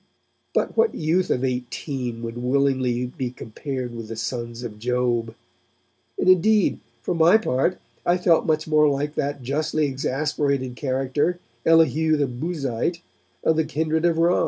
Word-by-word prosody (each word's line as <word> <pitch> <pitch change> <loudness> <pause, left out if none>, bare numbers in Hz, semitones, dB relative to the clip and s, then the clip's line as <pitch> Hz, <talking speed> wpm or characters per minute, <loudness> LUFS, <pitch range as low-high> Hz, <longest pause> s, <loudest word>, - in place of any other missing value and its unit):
But - - 0
what 455 0 +3
youth 170 +4 +1
of 125 - 0
eighteen 125 -1 -3
would 115 0 -5
willingly 130 -1 +1
be 125 0 -4
compared 125 +1 -6
with 115 -2 -7
the 115 - -6
sons 120 +1 -4
of 105 -3 -7
Job? 120 -1 0 0.8
And - - -1
indeed, 190 +3 +4 0.2
for - - -1
my 170 +5 +6
part, 175 -3 0 0.3
I 175 +1 +3
felt 175 -2 +3
much 155 0 +1
more 155 -1 +4
like 145 +1 -1
that 145 -2 -2
justly 150 +4 0
exasperated 135 -1 -1
character, 135 +5 0 0.3
Elihu 160 -1 +4
the 145 - +2
Buzite, 140 +3 -2 0.4
of 160 - +3
the 160 - +3
kindred 160 +1 -1
of 170 -2 +2
Ram. 170 +2 +3
140 Hz, 150 wpm, -23 LUFS, 125-160 Hz, 0.8 s, my